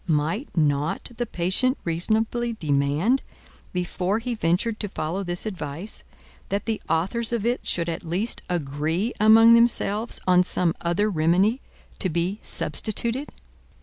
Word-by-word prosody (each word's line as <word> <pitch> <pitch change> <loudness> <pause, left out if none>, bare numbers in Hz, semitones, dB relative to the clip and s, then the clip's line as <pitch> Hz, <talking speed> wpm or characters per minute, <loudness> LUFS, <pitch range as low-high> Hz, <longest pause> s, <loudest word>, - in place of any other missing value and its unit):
Might 160 - 0
not 150 +5 0
the 240 - -2
patient 190 +10 +1
reasonably 220 +7 0
demand, 155 - +1 0.5
before 180 +2 -1
he 240 +2 -3
ventured 215 +3 0
to 205 - -3
follow 180 +3 -3
this 175 +1 -2
advice, 175 -1 -5 0.5
that 200 +1 -2
the 225 -2 -2
authors 195 +9 +2
of 230 -3 -1
it 240 +1 -1
should 170 -1 +1
at 165 0 -3
least 180 +8 -2
agree 160 - -1
among 225 +2 +7
themselves 230 -1 +3
on 180 0 +5
some 180 -2 +1
other 175 +5 +1
remedy 185 +7 +2 0.4
to 185 - 0
be 175 +5 -1
substituted? 235 +6 -2
190 Hz, 135 wpm, -24 LUFS, 165-225 Hz, 0.5 s, among